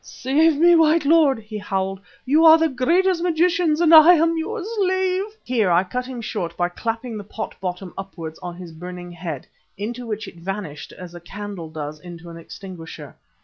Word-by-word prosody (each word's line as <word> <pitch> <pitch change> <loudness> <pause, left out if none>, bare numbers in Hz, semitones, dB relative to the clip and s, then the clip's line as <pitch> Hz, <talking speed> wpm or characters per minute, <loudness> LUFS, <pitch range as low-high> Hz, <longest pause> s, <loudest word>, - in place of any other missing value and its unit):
"Save 295 +4 +1
me, 345 +2 +6
white 320 -1 +4
lord!" 300 -3 +4
he 215 -1 -8
howled. 195 -1 -2 0.3
"You 300 +5 +4
are 320 0 +9
the 325 0 +2
greatest 340 +8 +2
of - - -4
magicians 335 -2 +2
and 335 -1 +4
I 320 +3 +10
am 330 +1 +2
your 405 +6 -3
slave." 375 -3 0 0.2
Here 230 -6 +1
I 175 +1 +4
cut 250 +7 -4
him 255 -2 -6
short 180 -7 -4
by 175 0 +1
clapping 225 +4 -4
the - - -7
pot 215 +2 -6
bottom 180 0 -5
upwards 170 -5 -8
on 175 -1 -7
his 175 -1 -10
burning 175 +2 -8
head, 165 -5 -6 0.3
into 235 +4 -5
which 215 -1 -4
it - - -12
vanished 170 -4 -6
as 180 -2 -10
a 175 - -9
candle 195 -2 -8
does 155 -1 -6
into 170 0 -10
an 165 - -10
extinguisher. 165 -5 -10
215 Hz, 190 wpm, -22 LUFS, -, 0.3 s, I